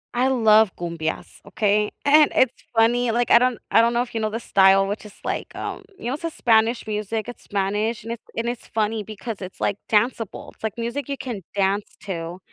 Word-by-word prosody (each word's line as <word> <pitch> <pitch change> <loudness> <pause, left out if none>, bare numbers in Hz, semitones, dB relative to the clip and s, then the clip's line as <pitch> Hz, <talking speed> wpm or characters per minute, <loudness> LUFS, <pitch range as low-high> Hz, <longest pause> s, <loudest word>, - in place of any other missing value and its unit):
I 250 +2 +3
love 220 -5 +4
cumbias, 165 -2 -4
okay? 210 0 +1 0.2
And 300 +1 +6
it's 255 -2 +4 0.2
funny, 240 +2 +3
like, 240 +1 0
I 235 - +9
don't 250 -1 +1
I 225 - +6
don't 235 +1 +2
know 240 +1 +2
if 245 - -12
you 225 - -2
know 215 - 0
the 225 +2 -4
style, 195 -2 +5
which 205 +2 -4
is 210 - -11
like, - - -4
um - - -5
you - - -11
know, 245 - -1
it's 300 - -6
a 330 - -1
Spanish 230 -4 +2
music. 215 +1 -3
It's 245 - -9
Spanish, 205 +3 -1
and 230 - -4
it's 235 - -10
and 230 +1 -1
it's 240 -1 -4
funny 220 0 -1
because 215 +1 -7
it's, 185 0 -8
like, 205 - 0
danceable. 225 0 0
It's - - -27
like 220 0 -3
music 235 +5 -3
you 275 - -2
can 235 -6 -5
dance 200 +1 0
to, 175 -3 -5
220 Hz, 220 wpm, -23 LUFS, 205-240 Hz, 0.2 s, I